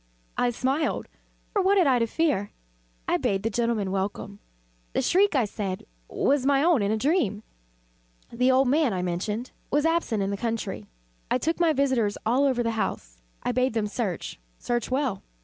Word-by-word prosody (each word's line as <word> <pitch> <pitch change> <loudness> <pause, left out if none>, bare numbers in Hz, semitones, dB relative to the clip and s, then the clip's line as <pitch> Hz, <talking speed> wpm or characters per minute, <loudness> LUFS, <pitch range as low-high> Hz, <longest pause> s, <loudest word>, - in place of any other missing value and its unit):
I 245 - +2
smiled, 265 +6 -1 0.5
for 405 - +2
what 390 +2 +3
had 365 - +5
I 260 -3 +4
to 230 - +1
fear? 265 -8 0 0.6
I - - +2
bade 195 0 -1
the 225 - 0
gentlemen 230 -4 0
welcome. 200 +1 -3 0.5
The - - +1
shriek, 390 -1 +3
I 255 -4 +3
said, 200 -2 -4 0.2
was 280 -1 +1
my 275 +1 +3
own 330 -7 +4
in 200 - +1
a 220 - +1
dream. 220 - +1 0.9
The 250 +2 +2
old 260 +1 +4
man, 285 -3 +3
I 180 -1 -2
mentioned, 205 +7 -3 0.2
was 295 +2 +1
absent 325 -11 +1
in 195 - -1
the 200 - -2
country. 215 - -3 0.4
I - - +2
took 325 +7 -1
my 340 -2 +4
visitors 260 -8 +1
all 250 +6 +3
over 255 -3 +1
the 230 - 0
house. - - -3 0.2
I - - 0
bade 255 0 +1
them 220 -2 +1
search 205 - -3 0.2
search 240 -2 -2
well. 260 -6 -1
240 Hz, 185 wpm, -26 LUFS, 205-280 Hz, 0.9 s, had